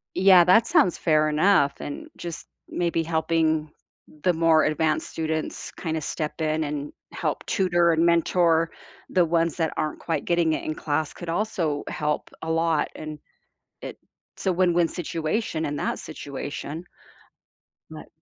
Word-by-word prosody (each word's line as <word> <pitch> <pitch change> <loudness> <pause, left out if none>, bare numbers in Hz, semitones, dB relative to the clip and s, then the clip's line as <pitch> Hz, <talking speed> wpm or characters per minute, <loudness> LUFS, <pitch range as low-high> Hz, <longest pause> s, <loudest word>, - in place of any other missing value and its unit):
Yeah, 185 -2 +7
that 185 +6 +5
sounds 180 -4 +3
fair 155 -1 +3
enough 150 -2 +3
and 145 - -6
just 170 -2 -7 0.2
maybe 170 -1 0
helping 160 -1 0 0.5
the 180 - +3
more 165 -1 +4
advanced 155 0 0
students 160 -1 -3
kinda 160 -2 -3
step 155 +1 -4
in 155 0 0
and 145 0 -4 0.2
help - - -2
tutor 175 -4 +2
and 165 +1 +2
mentor 170 -1 +3 0.4
the 180 - +4
ones 165 -1 +1
that 160 -2 0
aren't 155 -1 -2
quite 160 -4 -2
getting 170 -2 +2
it - - -4
in 155 - -2
class 155 0 -2
could 175 - -9
also 165 -6 -1
help 150 0 -2
a 160 - -3
lot, 165 -1 +1
and 155 -1 -7 0.6
it's - - -12
a 190 - +3
win-win 175 -2 +3
situation 165 0 -2
in 145 0 -3
that - - -2
situation. 145 +1 -6 1.1
But 155 - -10
160 Hz, 145 wpm, -25 LUFS, 155-170 Hz, 1.1 s, Yeah